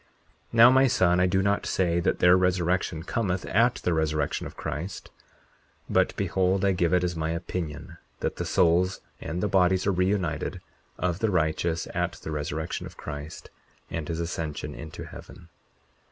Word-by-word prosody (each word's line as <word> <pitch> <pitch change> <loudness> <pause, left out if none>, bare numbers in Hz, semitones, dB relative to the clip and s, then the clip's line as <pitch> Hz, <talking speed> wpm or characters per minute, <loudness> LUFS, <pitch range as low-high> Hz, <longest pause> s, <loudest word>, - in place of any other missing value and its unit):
40:20 - - -29
Now, 115 +2 +8
my 130 +1 +5
son, 90 -6 +3
I 90 - +4
do 95 +1 +1
not 100 0 +1
say 85 -2 +1
that 85 - +1
their 90 0 +6
resurrection 90 -2 +1
cometh 95 -2 -1
at 120 +4 +3
the 90 - +1
resurrection 75 -2 -1
of - - -13
Christ; 90 +6 -5 0.8
but - - +2
behold, 95 +1 +1
I 100 - +4
give 90 -2 +1
it 90 -1 +3
as 90 -1 -1
my 80 0 -2
opinion, 85 -1 -5 0.2
that - - -2
the - - -2
souls 90 +3 +2 0.2
and 85 +5 -3
the - - +2
bodies 95 -1 +3
are 100 - +3
reunited, 90 -3 -1 0.4
of 90 0 -1
the 110 -1 +1
righteous, 80 -2 0
at - - -1
the 80 - -8
resurrection 75 +2 -3
of - - -14
Christ, 75 +1 -8 0.4
and 80 -2 -3
his 85 -1 -3
ascension 80 -3 -4
into 80 - -8
heaven. - - -12
90 Hz, 170 wpm, -27 LUFS, 80-95 Hz, 0.8 s, Now